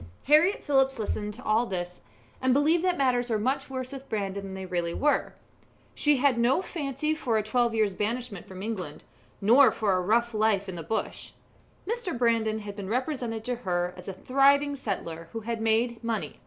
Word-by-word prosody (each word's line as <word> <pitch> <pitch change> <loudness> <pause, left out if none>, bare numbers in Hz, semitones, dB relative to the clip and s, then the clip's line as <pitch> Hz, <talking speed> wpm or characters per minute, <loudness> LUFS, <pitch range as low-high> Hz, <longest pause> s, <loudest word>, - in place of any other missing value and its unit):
Harriett 310 +7 +4
Phillips 270 -2 +2
listened 210 -1 -2
to 240 +5 -11
all 225 +3 +2
this, 180 -2 -5 0.4
and 260 0 +3
believed 315 +4 +3
that 365 -1 +1
matters 250 -2 +1
were 225 - +1
much 255 +7 -1
worse 260 -1 -4
with 275 0 -9
Brandon 200 -2 -2
than 195 -1 -7
they 190 0 -6
really 175 -2 -2
were. 295 - +1 0.6
She 295 -1 +3
had 260 -2 +2
no 245 +6 +3
fancy 305 -3 -2
for 245 -7 0
a 215 - 0
twelve 235 +1 +1
years' 215 -3 +2
banishment 215 -1 -3
from 190 0 -8
England, 185 -9 -5 0.4
nor 245 +7 +6
for 205 -3 0
a 185 - +1
rough 235 +5 +1
life 215 -2 +1
in 190 - -5
the 170 - -6
bush. 190 +8 -4 0.5
Mr. 450 - -2
Brandon 225 -2 +1
had 205 -1 -7
been 200 -2 -6
represented 245 -2 -2
to 245 +1 -2
her 180 -5 -1
as 180 - -12
a 195 - -4
thriving 280 +7 +3
settler 165 -9 -5
who 225 - -4
had 225 +1 -4
made 225 +1 +1
money. 230 -2 -3
230 Hz, 195 wpm, -27 LUFS, 200-265 Hz, 0.6 s, nor